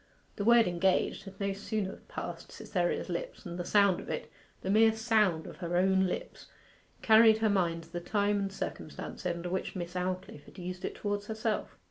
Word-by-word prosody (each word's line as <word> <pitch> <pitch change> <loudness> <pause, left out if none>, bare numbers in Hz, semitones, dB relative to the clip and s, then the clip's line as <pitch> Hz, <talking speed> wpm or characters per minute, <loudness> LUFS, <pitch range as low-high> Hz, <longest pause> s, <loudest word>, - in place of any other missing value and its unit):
The 200 - -3
word 235 0 +6
'engaged' 185 +2 +1
had 195 -1 -11
no 200 -1 0
sooner 200 0 -3
passed - - -6
Cytherea's - - -1
lips - - -5
than 175 -3 -6
the 175 - -2
sound 200 0 +4
of - - -9
it - - -4 0.3
the 190 - 0
mere 220 +1 +6
sound 215 -7 +2
of - - -9
her 175 -1 -2
own 190 +1 +3
lips - - -5 0.6
carried 220 0 +7
her 220 -1 +2
mind 170 -4 +1
to 165 +2 -19
the 175 - -2
time 205 +3 +1
and 195 -1 -2
circumstances 190 - -5
under 170 +1 -5
which 190 +2 -2
Miss 175 -1 -5
Aldclyffe 185 -4 -3
had - - -16
used 180 0 -6
it - - -4
towards 205 0 -3
herself. 220 0 -2
195 Hz, 190 wpm, -31 LUFS, 180-215 Hz, 0.6 s, carried